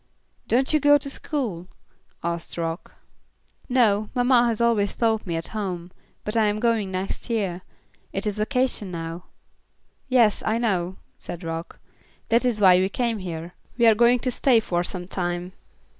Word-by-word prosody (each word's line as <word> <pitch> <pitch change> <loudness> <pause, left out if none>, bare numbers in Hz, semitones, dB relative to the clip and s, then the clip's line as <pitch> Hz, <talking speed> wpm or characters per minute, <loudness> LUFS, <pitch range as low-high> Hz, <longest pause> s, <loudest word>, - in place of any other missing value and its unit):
"Don't 260 +5 +2
you 305 - +4
go 290 0 +6
to 280 0 -6
school?" 225 - -4 0.6
asked 170 0 -4
Rock. 165 +1 -4 0.7
"No, 215 -5 +3
mamma 245 -1 +4
has 230 -2 -1
always 230 -4 +2
taught 220 -3 0
me 170 - -2
at 165 0 -4
home, 185 -5 -4 0.3
but 210 - -3
I 220 -2 +4
am 210 0 0
going 225 -4 +1
next 190 +5 -4
year. 195 -6 -1 0.5
It 195 - -3
is 210 0 -2
vacation 250 -3 0
now." 165 0 -6 0.8
"Yes, 240 -5 +3
I 220 +1 +1
know," 190 -6 -1 0.2
said 175 - -7
Rock, 165 0 -5 0.5
"that 235 +2 +3
is 245 -4 0
why 185 -3 +7
we 190 +1 +1
came 230 0 -1
here. 170 -2 -6 0.2
We 235 - +4
are 225 - +8
going 240 +3 +4
to 255 - 0
stay 245 -1 +4
for 175 -5 -1
some 180 -1 -5
time. 175 -1 -3
210 Hz, 165 wpm, -24 LUFS, 180-235 Hz, 0.8 s, are